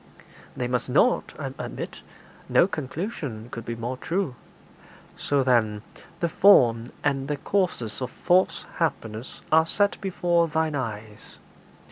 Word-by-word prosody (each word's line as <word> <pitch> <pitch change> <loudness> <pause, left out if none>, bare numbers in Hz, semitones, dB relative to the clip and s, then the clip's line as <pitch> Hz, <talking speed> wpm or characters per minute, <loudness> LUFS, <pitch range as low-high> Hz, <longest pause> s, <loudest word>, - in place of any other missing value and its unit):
'They 125 - -1
must 125 0 -1
not, - - +3
I - - -5
admit. - - -6 0.5
No - - +5
conclusion 145 - -5
could 115 - -6
be 115 - -3
more 120 +3 -4
true.' 170 -1 -1 0.8
'So, 140 -2 +1
then, 110 -5 +2 0.4
the 170 - +2
form 125 - +5
and 135 -2 0
the 150 0 -1
causes 140 - -1
of 125 - -2
false 175 -1 +2
happiness 115 -8 -3
are 160 +1 +5
set 205 +3 +1
before 175 -3 +1
thine 160 0 0
eyes. 110 -5 -5
140 Hz, 130 wpm, -25 LUFS, 115-170 Hz, 0.8 s, No